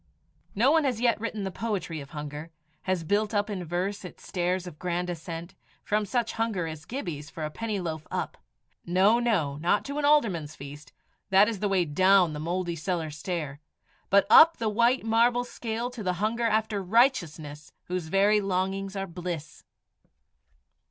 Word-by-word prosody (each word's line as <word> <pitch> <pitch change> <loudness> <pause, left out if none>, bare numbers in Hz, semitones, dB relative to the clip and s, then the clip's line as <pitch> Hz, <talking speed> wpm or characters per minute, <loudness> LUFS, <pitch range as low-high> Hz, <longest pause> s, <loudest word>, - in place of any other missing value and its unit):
No 240 +7 +4
one 320 0 +4
has 255 -5 0
yet 235 -3 +2
written 220 -2 -3
the 190 - -3
poetry 190 -8 -3
of 140 - -11
hunger 150 +1 -7 0.4
has 185 -3 +1
built 205 +5 0
up 205 +1 0
in 190 -3 -3
verse 180 +5 -3
its 180 - -11
stairs 180 0 -1
of 165 -4 -10
grand 180 0 -2
ascent 165 +1 -7 0.3
from 210 0 0
such 235 +1 0
hunger 225 -6 -1
as 160 -1 -7
Gibbie's 160 - -5
for 160 -1 -5
a 155 - -5
penny 215 +2 -3
loaf 160 -3 -5
up - - -3 0.5
no, 190 +6 +4
no, 175 -13 0
not 175 +6 +1
to 280 +1 -3
an - - -2
alderman's 195 - +2
feast; 140 0 -10 0.4
that 195 +2 +6
is 225 -4 -3
the 205 - 0
way 190 -3 +2
down 185 +2 +4
the 150 - -5
mouldy 175 +2 -2
cellar 165 -1 -2
stair 150 -2 -4 0.5
but 200 +1 +5
up 330 +1 +8
the 225 -2 0
white 235 +4 +2
marble 235 +2 +3
scale 235 0 -4
to 245 -3 -8
the 185 -3 0
hunger 220 +6 -1
after 215 -2 0
righteousness 170 - +1
whose 180 -2 -4
very 200 +4 +3
longings 195 +1 -2
are 195 0 -2
bliss. 175 -3 -6
190 Hz, 175 wpm, -27 LUFS, 165-220 Hz, 0.5 s, up